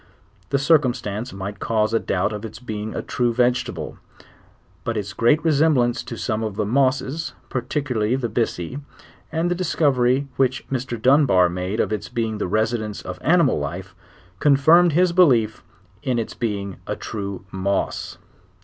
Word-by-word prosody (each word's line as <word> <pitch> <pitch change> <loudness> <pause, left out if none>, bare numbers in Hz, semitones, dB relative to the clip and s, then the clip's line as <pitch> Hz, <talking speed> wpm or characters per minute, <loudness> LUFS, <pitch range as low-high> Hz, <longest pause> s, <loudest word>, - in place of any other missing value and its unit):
The 140 - +2
cir 150 +3 +5
cumstance 120 -3 -3
might 100 +1 -6
cause 110 -1 0
a 115 - +3
doubt 95 +3 -1
of 105 0 -6
its 110 -1 -7
being 110 -2 -5
a - - -3
true 120 -1 0
vegetable,; 125 +1 -1 0.8
but 115 -1 -2
its 100 -1 -4
great 135 +10 +2
resemblance 145 -6 +3
to 115 - -6
some 110 0 -2
of 110 -3 -3
the 105 - -1
mosses, 135 +6 0
particular 125 -3 -1
ly 125 - +3
the 130 -2 -1
byssi, 115 - -2 0.5
and 165 +2 0
the - - +4
discovery 140 -7 +1
which 130 -1 +1
Mr. 125 -3 -3
Dunbar 125 - +4
made 90 +4 -3
of - - +1
its 105 - -4
being 110 -2 -2
the - - -1
residence 110 +1 -1
of 90 0 -7
animal 170 - +3
life, 90 +7 -5 0.5
confirmed 160 +4 +5
his 175 +2 +3
belief 125 - +3 0.4
in 125 -1 -1
its 115 - -3
being 100 -5 -3
a - - -2
true 100 -2 -6
moss. 95 +1 -2
120 Hz, 160 wpm, -22 LUFS, 105-140 Hz, 0.8 s, cir